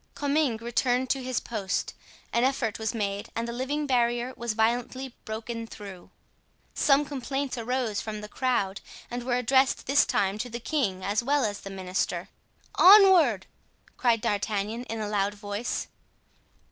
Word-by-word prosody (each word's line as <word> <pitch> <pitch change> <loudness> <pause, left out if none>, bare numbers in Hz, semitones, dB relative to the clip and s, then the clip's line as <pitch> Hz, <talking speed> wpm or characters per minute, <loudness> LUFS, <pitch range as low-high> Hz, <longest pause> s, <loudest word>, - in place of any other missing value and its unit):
Comminges 285 -5 0
returned 245 +1 +1
to 270 - 0
his 255 -1 -1
post. 200 -5 -3 0.4
An 235 - +2
effort 255 -5 0
was 220 +2 -2
made 200 -2 -2
and 230 +1 -2
the - - -3
living 280 +5 -2
barrier 240 -1 +1
was 235 -2 -3
violently 240 +3 -1
broken 230 +1 -5
through. 195 -5 -10 0.6
Some 285 0 +3
complaints 275 -1 -3
arose 240 -2 -1
from 215 -1 -5
the 210 - -7
crowd 210 -5 -1 0.3
and 245 +1 -3
were 245 0 0
addressed 260 +2 +2
this 280 +2 +4
time 195 +1 0
to 245 +3 -3
the 235 +1 -5
king 220 -9 -1
as 205 +3 +1
well 280 0 +2
as 205 -1 -3
the 195 - -9
minister. 190 -1 -3 0.5
"Onward!" 365 - +7 0.5
cried 235 -3 +2
D'Artagnan, 210 +3 -1
in 225 -1 -5
a 215 - -2
loud 205 0 0
voice. 205 +3 -3
235 Hz, 155 wpm, -27 LUFS, 210-260 Hz, 0.6 s, Onward